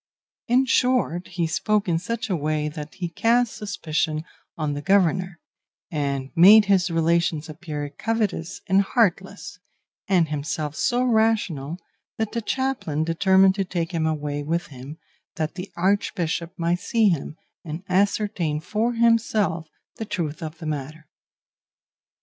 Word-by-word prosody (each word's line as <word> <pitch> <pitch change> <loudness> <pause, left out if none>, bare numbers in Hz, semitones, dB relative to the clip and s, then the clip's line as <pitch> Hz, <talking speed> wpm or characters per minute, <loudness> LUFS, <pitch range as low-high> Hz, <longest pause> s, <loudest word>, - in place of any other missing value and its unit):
In 255 +3 +3
short, 250 -9 +1
he 175 -2 -2
spoke 205 +5 0
in 165 -2 +1
such 230 +6 -3
a 190 - 0
way 150 -1 -1
that 150 0 -8
he 180 - -3
cast 230 +7 +1
suspicion 155 -6 -2 0.3
on 155 -2 -1
the 145 - -4
governor, 185 0 +2 0.5
and 140 -3 -2
made 210 +5 +8
his 190 -2 +3
relations 165 -1 +1
appear 155 -2 -5
covetous 205 +2 -2
and 195 0 +4
heartless, 200 -2 -1 0.5
and 180 -4 +3
himself 150 0 -3
so 245 +6 +1
rational 220 - +1 0.4
that 220 -1 -2
the 235 - -2
chaplain 240 - -1
determined 190 +3 +4
to 195 0 -1
take 175 -3 -3
him 160 -2 0
away 145 -2 -2
with 165 +4 -1
him 135 +4 -9 0.4
that 155 -2 -2
the 180 +2 -7
Archbishop 175 -3 0
might 170 0 0
see 220 +2 +2
him, 155 -3 -2 0.3
and 160 +2 -6
ascertain 190 -4 0
for 220 +8 -1
himself 225 -7 +2 0.3
the 220 - -4
truth 170 -5 -3
of 160 0 -6
the 160 - -9
matter. 155 +1 -5
175 Hz, 140 wpm, -24 LUFS, 155-205 Hz, 0.5 s, made